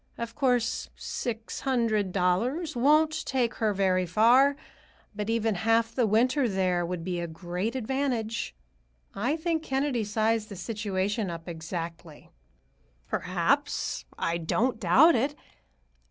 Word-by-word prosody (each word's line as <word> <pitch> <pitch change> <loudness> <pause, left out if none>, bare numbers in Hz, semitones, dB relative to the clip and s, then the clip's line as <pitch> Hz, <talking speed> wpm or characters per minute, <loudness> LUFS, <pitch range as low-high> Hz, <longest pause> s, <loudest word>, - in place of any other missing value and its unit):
Of 235 -1 -5
course, 250 -4 0
six 230 -2 -5
hundred 230 -7 0
dollars 235 - 0
won't 305 +5 +3
take 250 -3 0
her 215 -1 +3
very 185 -2 +1
far, 245 +9 +5 0.6
but 210 +1 -3
even 225 -1 +1
half 225 +4 +1
the 240 -3 +2
winter 250 +5 +2
there 185 -3 +1
would 175 -1 -4
be 180 0 -2
a 170 - -3
great 180 +7 -4
advantage. 240 - -2 0.6
I 245 +10 -1
think 325 -1 -1
Kennedy 270 -5 -1
sized 215 +1 0
the 200 - -7
situation 200 +1 -2
up 165 0 -7
exactly." 165 -1 -7 0.8
"Perhaps; - - 0
I 170 +1 -1
don't 225 +8 0
doubt 265 - +6
it. 275 +5 0
225 Hz, 125 wpm, -28 LUFS, 185-255 Hz, 0.8 s, doubt